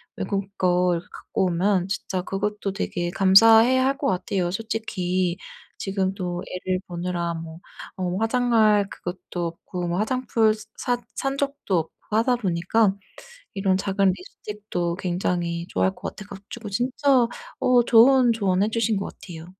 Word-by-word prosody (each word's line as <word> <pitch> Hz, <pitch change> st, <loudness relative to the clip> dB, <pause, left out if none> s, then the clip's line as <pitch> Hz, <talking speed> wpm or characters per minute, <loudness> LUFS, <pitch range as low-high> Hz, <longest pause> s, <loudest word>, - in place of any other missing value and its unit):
외국 200 Hz, -2 st, -2 dB
거 180 Hz, 0 st, +2 dB
이렇게 170 Hz, 0 st, -4 dB
갖고 190 Hz, -, -2 dB
오면 185 Hz, +1 st, +1 dB
진짜 190 Hz, -1 st, -2 dB
그것도 200 Hz, +1 st, -3 dB
되게 175 Hz, -3 st, -2 dB
감사해 225 Hz, +6 st, +6 dB
할 270 Hz, +2 st, +1 dB
것 -, -, -1 dB
같아요. 185 Hz, -1 st, -1 dB
솔직히 185 Hz, -4 st, -2 dB, 0.4 s
지금도 190 Hz, -2 st, -2 dB, 0.2 s
애를 185 Hz, 0 st, 0 dB
보느라 175 Hz, -1 st, -3 dB
뭐 165 Hz, 0 st, -8 dB, 0.4 s
어 180 Hz, -1 st, -2 dB
화장할 225 Hz, -3 st, +3 dB
그것도 175 Hz, -1 st, -5 dB
없고 175 Hz, +1 st, -6 dB
뭐 170 Hz, +1 st, -1 dB
화장품 225 Hz, -1 st, +1 dB, 0.2 s
샀 245 Hz, -1 st, -1 dB, 0.2 s
산 270 Hz, 0 st, -2 dB
적도 280 Hz, -9 st, -1 dB
없고 160 Hz, -, -6 dB, 0.2 s
하다 240 Hz, +2 st, +3 dB
보니까 195 Hz, +1 st, +1 dB, 0.6 s
이런 195 Hz, -1 st, +1 dB
작은 195 Hz, 0 st, +1 dB
립스틱도 185 Hz, -2 st, -5 dB
굉장히 175 Hz, -2 st, -2 dB
좋아할 95 Hz, +1 st, 0 dB
것 -, -, -6 dB
같아 210 Hz, -, -9 dB
가지고 205 Hz, +3 st, -9 dB
진짜 250 Hz, +3 st, +2 dB, 0.3 s
어 250 Hz, -1 st, +4 dB
좋은 245 Hz, +1 st, +6 dB
조언해 200 Hz, -2 st, +1 dB
주신 225 Hz, -1 st, +1 dB
것 195 Hz, -, -2 dB
같아요. 165 Hz, -3 st, -10 dB
195 Hz, 290 characters per minute, -24 LUFS, 180-225 Hz, 0.6 s, 감사해